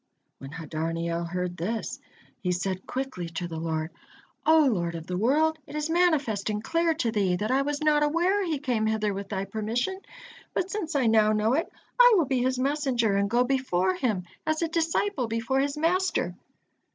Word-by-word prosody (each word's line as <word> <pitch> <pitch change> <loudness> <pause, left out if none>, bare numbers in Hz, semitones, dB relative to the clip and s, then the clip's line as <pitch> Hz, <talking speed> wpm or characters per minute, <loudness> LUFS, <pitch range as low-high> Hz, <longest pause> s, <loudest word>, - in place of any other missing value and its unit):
When 135 - -8
Hadarniel 165 +2 -3
heard 180 0 -3
this, 225 +8 -3 0.4
he 180 - -1
said 185 +1 -2
quickly 255 -10 -4
to 170 +1 -4
the 165 -1 -5
Lord: 160 0 -2 0.6
"O 315 -1 +6
Lord 170 -9 0
of 165 -1 -6
the 180 - -4
world! 305 - +2
It - - -9
is 300 +1 -2
manifest 295 - +2
and 210 0 -2
clear 330 +4 +1
to 240 -8 0
Thee, 195 -5 +1
that 210 +5 -2
I 265 +1 +3
was 290 +1 -2
not 300 -1 +4
aware 345 +7 +2
he 330 -5 -1
came 245 -6 0
hither 215 -1 0
with 195 0 -6
Thy 195 -1 -2
permission, 230 - -2 0.5
but 370 +1 -1
since 365 -8 -3
I 270 -3 +2
now 215 -1 +4
know 215 +2 +2
it, 320 +5 0 0.3
I - - +8
will 335 - +3
be 260 -2 0
his 260 +1 +1
messenger 255 -6 +1
and 200 0 +1
go 240 +3 +3
before 245 -9 +1
him 190 -1 -1 0.2
as 315 +1 0
a - - +1
disciple 330 - 0
before 230 +4 0
his 280 +2 0
master." 365 +4 +1
240 Hz, 190 wpm, -27 LUFS, 190-300 Hz, 0.6 s, I